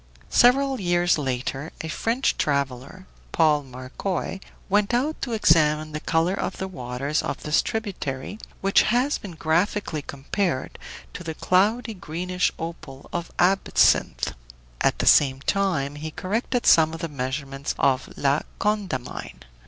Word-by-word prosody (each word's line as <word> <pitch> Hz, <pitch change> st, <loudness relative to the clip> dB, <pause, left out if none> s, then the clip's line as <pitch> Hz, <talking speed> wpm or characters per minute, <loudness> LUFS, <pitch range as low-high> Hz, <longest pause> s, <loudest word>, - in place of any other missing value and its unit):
Several 265 Hz, +2 st, +4 dB
years 175 Hz, -2 st, +2 dB
later 135 Hz, +2 st, -3 dB
a 160 Hz, -, -5 dB
French 230 Hz, +10 st, 0 dB
traveler, 140 Hz, +5 st, -2 dB, 0.3 s
Paul 155 Hz, -3 st, +3 dB
Marcoy, 135 Hz, +9 st, -4 dB, 0.3 s
went 205 Hz, +3 st, +2 dB
out 290 Hz, +6 st, -1 dB
to 245 Hz, -, -3 dB
examine 155 Hz, -6 st, +3 dB
the 150 Hz, -, -4 dB
color 165 Hz, +3 st, +1 dB
of -, -, -3 dB
the 190 Hz, -, -3 dB
waters 135 Hz, -2 st, -2 dB
of -, -, -4 dB
this 150 Hz, +1 st, +3 dB
tributary, 200 Hz, -6 st, -4 dB, 0.2 s
which 195 Hz, 0 st, +4 dB
has 250 Hz, +5 st, +1 dB
been 195 Hz, -4 st, -8 dB
graphically 160 Hz, +1 st, 0 dB
compared 140 Hz, +3 st, -3 dB, 0.3 s
to 180 Hz, -, -7 dB
the 160 Hz, -2 st, -5 dB
cloudy 215 Hz, +8 st, +2 dB
greenish 180 Hz, 0 st, -2 dB
opal 160 Hz, -5 st, -8 dB
of 175 Hz, -1 st, -3 dB
absinthe. 190 Hz, +2 st, +3 dB, 0.5 s
At -, -, +2 dB
the -, -, -1 dB
same 135 Hz, -2 st, +5 dB
time 170 Hz, -7 st, 0 dB
he 150 Hz, +2 st, -6 dB
corrected 225 Hz, +9 st, -2 dB
some 160 Hz, 0 st, +5 dB
of 165 Hz, -, -8 dB
the 165 Hz, -, -2 dB
measurements 135 Hz, 0 st, -4 dB
of 135 Hz, -1 st, +1 dB
La 140 Hz, +1 st, +2 dB, 0.2 s
Condamine. 185 Hz, -, -3 dB
165 Hz, 135 wpm, -24 LUFS, 140-195 Hz, 0.5 s, same